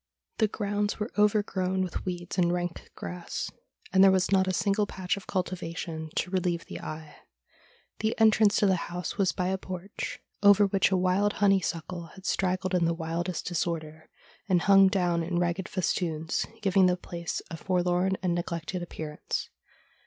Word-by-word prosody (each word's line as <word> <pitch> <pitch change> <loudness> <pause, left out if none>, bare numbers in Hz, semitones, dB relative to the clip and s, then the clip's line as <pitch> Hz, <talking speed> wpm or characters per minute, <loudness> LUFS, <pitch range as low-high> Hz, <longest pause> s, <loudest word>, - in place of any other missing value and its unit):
The 220 - +4
grounds 205 0 -2
were 210 +2 -3
overgrown 200 -3 +2
with 180 - -4
weeds 175 0 -4
and 175 -1 +3
rank 175 -1 -3
grass, 180 -1 -5 0.4
and 190 0 +7
there 195 - +8
was 190 0 +2
not 190 -1 +4
a - - +2
single 205 +2 +1
patch 185 -2 -2
of 200 - -10
cultivation 165 -3 -3
to 180 - -1
relieve 175 -3 0
the - - -7
eye. 155 0 -8 0.8
The 220 +1 -1
entrance 215 -2 +5
to - - +3
the 190 -2 +3
house 175 +3 -5
was 190 -3 +3
by 180 0 -1
a 190 0 -1
porch, 185 +1 -6 0.2
over 205 0 +7
which 195 -1 +2
a 190 - +2
wild 185 +3 +2
honeysuckle 180 -3 0
had 190 - -13
straggled 185 0 0
in 175 -2 +3
the 165 0 +1
wildest 165 +2 -3
disorder, 160 -2 -3 0.4
and 180 -2 +3
hung 195 -1 +7
down 180 -3 +1
in 170 +1 -2
ragged 175 +1 -1
festoons, 165 -4 -1 0.2
giving 195 -1 +5
the 180 0 +2
place 170 -1 -5
a - - -3
forlorn 180 +2 +1
and 180 -2 +1
neglected 170 +1 -3
appearance. 155 -3 -5
185 Hz, 165 wpm, -28 LUFS, 170-195 Hz, 0.8 s, there